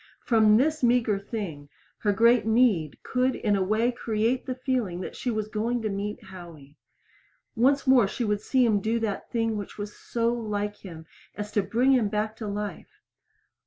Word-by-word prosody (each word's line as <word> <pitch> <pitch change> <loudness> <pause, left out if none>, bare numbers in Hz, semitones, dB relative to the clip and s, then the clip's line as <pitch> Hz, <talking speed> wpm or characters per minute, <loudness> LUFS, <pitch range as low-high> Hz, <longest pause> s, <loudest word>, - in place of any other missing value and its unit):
From 220 -4 +5
this 310 +5 +1
meager 235 -4 +2
thing 190 -9 -6 0.3
her 205 - +1
great 230 +4 +4
need 220 - +2
could 255 0 0
in 210 -2 0
a 195 - 0
way 215 +6 +1
create 235 +2 -1
the 255 - -2
feeling 250 -9 -2
that - - -6
she 250 - -3
was 215 -2 -2
going 225 +3 -1
to 215 - -1
meet 200 +1 -4
Howie. 165 -6 -12 0.8
Once 275 +5 +3
more 255 -6 +5
she 225 +4 -3
would 210 -2 0
see 260 -2 +2
him 215 -3 +2
do 220 +3 0
that 215 -3 -3
thing 225 -2 -1
which 205 - -7
was 205 0 -6
so 235 0 -1
like 210 -3 -3
him 165 -4 -11 0.3
as 210 0 -5
to 210 - +2
bring 245 +6 +2
him 240 -6 +3
back 210 +1 -1
into 215 - -3
life. 205 -4 -6
215 Hz, 185 wpm, -26 LUFS, 205-240 Hz, 0.8 s, From